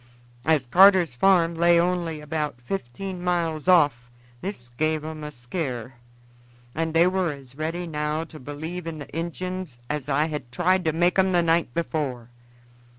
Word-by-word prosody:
As 155 Hz, -3 st, +3 dB
Carter's 180 Hz, +2 st, +6 dB
farm 170 Hz, +5 st, +4 dB
lay 170 Hz, +1 st, +4 dB
only 170 Hz, -3 st, 0 dB
about 150 Hz, -3 st, -3 dB
fifteen 180 Hz, +6 st, -5 dB
miles 170 Hz, -3 st, -1 dB
off 145 Hz, -9 st, +4 dB, 0.3 s
this 185 Hz, -11 st, -6 dB
gave 155 Hz, +5 st, -1 dB
'em 155 Hz, -1 st, -6 dB
a 150 Hz, -, -4 dB
skear, 125 Hz, -, -5 dB, 0.8 s
and 160 Hz, 0 st, -2 dB
they 165 Hz, +1 st, +6 dB
were 185 Hz, -2 st, +1 dB
as 135 Hz, -3 st, -11 dB
ready 160 Hz, +5 st, -3 dB
now 150 Hz, -1 st, -2 dB
to 160 Hz, -1 st, -12 dB
believe 160 Hz, +6 st, -6 dB
in 165 Hz, -1 st, -4 dB
the 145 Hz, 0 st, -9 dB
Injuns 175 Hz, -2 st, -4 dB
as 150 Hz, -2 st, -3 dB
I 145 Hz, +2 st, +2 dB
had 150 Hz, -6 st, -5 dB
tried 180 Hz, +5 st, +2 dB
to 160 Hz, -, +3 dB
make 175 Hz, +4 st, +2 dB
'em 190 Hz, 0 st, +3 dB
the 175 Hz, -1 st, +4 dB
night 165 Hz, -6 st, +1 dB
before. 135 Hz, -8 st, -3 dB
160 Hz, 160 wpm, -25 LUFS, 145-175 Hz, 0.8 s, Carter's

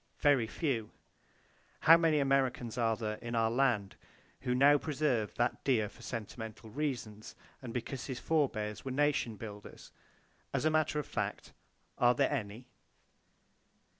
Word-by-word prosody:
Very 140 Hz, -6 st, +3 dB
few! 115 Hz, -2 st, -2 dB, 0.9 s
How 165 Hz, -, +9 dB
many 165 Hz, -2 st, +3 dB
Americans 135 Hz, -4 st, +1 dB
are 115 Hz, -2 st, +1 dB
there 110 Hz, -1 st, -3 dB
in 120 Hz, 0 st, -5 dB
our 115 Hz, -1 st, +2 dB
land 120 Hz, -6 st, +1 dB, 0.4 s
who 125 Hz, -1 st, -1 dB
now 145 Hz, +3 st, +6 dB
preserve 135 Hz, -9 st, -1 dB
that 120 Hz, 0 st, 0 dB
deer 110 Hz, -6 st, +2 dB
for 115 Hz, -, -17 dB
sentimental 115 Hz, -1 st, -7 dB
reasons, 120 Hz, -7 st, -4 dB, 0.3 s
and 125 Hz, -3 st, -7 dB
because 125 Hz, +2 st, -4 dB
his 130 Hz, -3 st, -4 dB
forbears 110 Hz, -10 st, -1 dB
were 135 Hz, -, -4 dB
nation 135 Hz, -4 st, +1 dB
builders? 105 Hz, -1 st, -10 dB, 0.6 s
As -, -, 0 dB
a 155 Hz, -, +4 dB
matter 155 Hz, -1 st, +1 dB
of 150 Hz, -, -1 dB
fact, -, -, -4 dB, 0.5 s
are 120 Hz, 0 st, +5 dB
there 140 Hz, +3 st, +2 dB
any? 115 Hz, -2 st, -4 dB
125 Hz, 140 wpm, -32 LUFS, 110-140 Hz, 0.9 s, How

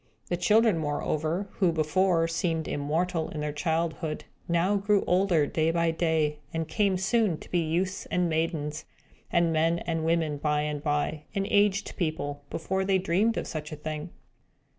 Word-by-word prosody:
The 175 Hz, -, +1 dB
children, 210 Hz, +1 st, +4 dB
moreover, 155 Hz, +4 st, -1 dB
who 185 Hz, -4 st, +4 dB
before 165 Hz, +2 st, +2 dB
seemed 165 Hz, -1 st, -1 dB
immortal 160 Hz, +3 st, -1 dB
in 155 Hz, -, -6 dB
their 150 Hz, 0 st, -2 dB
childhood, 160 Hz, 0 st, -1 dB, 0.2 s
now 175 Hz, +4 st, +2 dB
grew 205 Hz, 0 st, +2 dB
older, 180 Hz, -4 st, +3 dB
day 160 Hz, +2 st, +1 dB
by 170 Hz, 0 st, +2 dB
day, 160 Hz, -2 st, 0 dB
and 165 Hz, -1 st, -2 dB
came 200 Hz, +1 st, +1 dB
soon 195 Hz, -2 st, +1 dB
to -, -, -14 dB
be 175 Hz, -, +2 dB
youths 175 Hz, +4 st, -1 dB
and 180 Hz, -1 st, +1 dB
maidens, 160 Hz, -2 st, -2 dB, 0.4 s
and 170 Hz, -1 st, +2 dB
men 165 Hz, +2 st, +2 dB
and 165 Hz, -2 st, -2 dB
women 160 Hz, -2 st, +1 dB
by 150 Hz, 0 st, +1 dB
and 150 Hz, -1 st, -2 dB
by, 150 Hz, 0 st, -1 dB
and 195 Hz, 0 st, 0 dB
aged 205 Hz, -1 st, +2 dB
people, 150 Hz, -5 st, -2 dB
before 190 Hz, +4 st, -1 dB
they 190 Hz, 0 st, +3 dB
dreamed 190 Hz, +5 st, +1 dB
of -, -, -2 dB
such 155 Hz, 0 st, -5 dB
a -, -, -4 dB
thing. 155 Hz, +2 st, -5 dB
165 Hz, 165 wpm, -28 LUFS, 155-185 Hz, 0.4 s, children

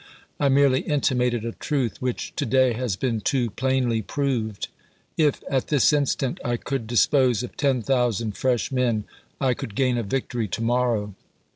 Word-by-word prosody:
I 140 Hz, -, +3 dB
merely 135 Hz, -1 st, +4 dB
intimated 125 Hz, -5 st, 0 dB
a 115 Hz, -, -2 dB
truth 130 Hz, -2 st, -2 dB
which 125 Hz, -1 st, -3 dB
to -, -, 0 dB
day 130 Hz, 0 st, +3 dB
has 120 Hz, -4 st, -2 dB
been 115 Hz, 0 st, -1 dB
too 120 Hz, -1 st, 0 dB
plainly 125 Hz, -1 st, 0 dB
proved. 115 Hz, -4 st, -2 dB, 0.5 s
If, 150 Hz, -3 st, +1 dB
at 130 Hz, -2 st, 0 dB
this 145 Hz, -1 st, +3 dB
instant, 140 Hz, -3 st, 0 dB
I 120 Hz, 0 st, 0 dB
could 130 Hz, -2 st, -4 dB
dispose 125 Hz, +1 st, +3 dB
of 125 Hz, -, -7 dB
ten 135 Hz, -5 st, +1 dB
thousand 115 Hz, -4 st, 0 dB
fresh 125 Hz, +4 st, 0 dB
men, 120 Hz, -5 st, +1 dB, 0.4 s
I 130 Hz, -2 st, +2 dB
could 110 Hz, -3 st, -7 dB
gain 125 Hz, -1 st, +2 dB
a -, -, 0 dB
victory 120 Hz, 0 st, -2 dB
to 110 Hz, +4 st, -3 dB
morrow. 115 Hz, -4 st, 0 dB
125 Hz, 165 wpm, -24 LUFS, 115-135 Hz, 0.5 s, merely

